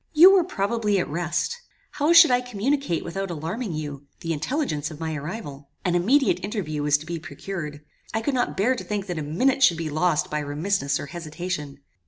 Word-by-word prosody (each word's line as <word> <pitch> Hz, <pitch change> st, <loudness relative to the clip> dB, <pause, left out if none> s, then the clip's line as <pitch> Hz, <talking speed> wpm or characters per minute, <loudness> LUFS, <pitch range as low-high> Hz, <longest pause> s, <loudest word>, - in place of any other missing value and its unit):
You 350 Hz, +5 st, +9 dB
were 380 Hz, -3 st, +5 dB
probably 210 Hz, -, 0 dB
at 180 Hz, -, 0 dB
rest. 175 Hz, -, -1 dB, 0.4 s
How 295 Hz, +3 st, +1 dB
should 335 Hz, -4 st, +9 dB
I 250 Hz, 0 st, +4 dB
communicate 250 Hz, -, -1 dB
without 195 Hz, +3 st, -3 dB
alarming 175 Hz, +6 st, -4 dB
you, 145 Hz, -2 st, -6 dB
the 165 Hz, -2 st, -1 dB
intelligence 155 Hz, -, -2 dB
of 155 Hz, -2 st, -10 dB
my 160 Hz, -1 st, -3 dB
arrival? 145 Hz, -3 st, -7 dB, 0.2 s
An 180 Hz, -, +2 dB
immediate 245 Hz, +11 st, +3 dB
interview 180 Hz, -8 st, -3 dB
was 145 Hz, 0 st, +3 dB
to 150 Hz, -, -11 dB
be 170 Hz, +1 st, -4 dB
procured. 155 Hz, -1 st, -6 dB, 0.3 s
I 220 Hz, -, -1 dB
could 285 Hz, -, 0 dB
not 250 Hz, -1 st, 0 dB
bear 240 Hz, +7 st, +3 dB
to -, -, -6 dB
think 205 Hz, -2 st, -3 dB
that 175 Hz, -4 st, -4 dB
a -, -, -2 dB
minute 250 Hz, -, +1 dB
should 175 Hz, -10 st, +5 dB
be 160 Hz, -2 st, -3 dB
lost 155 Hz, +1 st, +1 dB
by 150 Hz, -, 0 dB
remissness 145 Hz, 0 st, -1 dB
or -, -, -5 dB
hesitation. 155 Hz, -2 st, -5 dB
175 Hz, 200 wpm, -24 LUFS, 150-230 Hz, 0.4 s, You